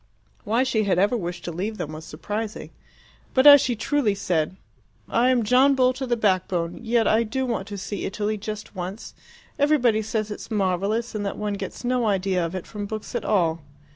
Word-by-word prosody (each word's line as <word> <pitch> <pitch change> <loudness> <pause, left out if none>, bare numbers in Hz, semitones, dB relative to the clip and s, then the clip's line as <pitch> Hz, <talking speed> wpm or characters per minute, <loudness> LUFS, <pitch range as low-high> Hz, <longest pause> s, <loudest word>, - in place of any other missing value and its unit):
Why 230 +5 +2
she 220 -5 0
had 190 -3 +2
ever 205 +6 +3
wished 175 -5 -4
to 175 - -3
leave 200 +6 -4
them 155 - -4
was 155 +1 -8
surprising; 210 +8 -5 0.6
but 260 +1 +4
as 285 -2 +10
she 245 - 0
truly 230 -2 0
said, 175 -3 -1 0.5
"I 245 +2 +2
am 250 -2 +3
John 260 +5 +4
Bull 255 -1 +3
to 260 +1 -5
the 240 -1 +1
backbone, 185 -4 0
yet 235 -1 +2
I 220 - +4
do 260 +4 -2
want 225 -5 -2
to 205 -1 -6
see 200 +1 -4
Italy, 210 +2 -2
just 210 0 -7
once. 185 +4 -6 0.5
Everybody 260 -7 +3
says 215 0 -2
it - - -5
is - - -10
marvellous, 205 +3 0
and 210 -1 -3
that 200 - -3
one 210 -1 -2
gets 200 - -6
no 245 -1 +1
idea 190 -3 +1
of 165 +2 -3
it 185 - -5
from 205 -2 -6
books 215 0 -6
at 240 - -3
all." 170 -6 +1
215 Hz, 205 wpm, -24 LUFS, 190-240 Hz, 0.6 s, as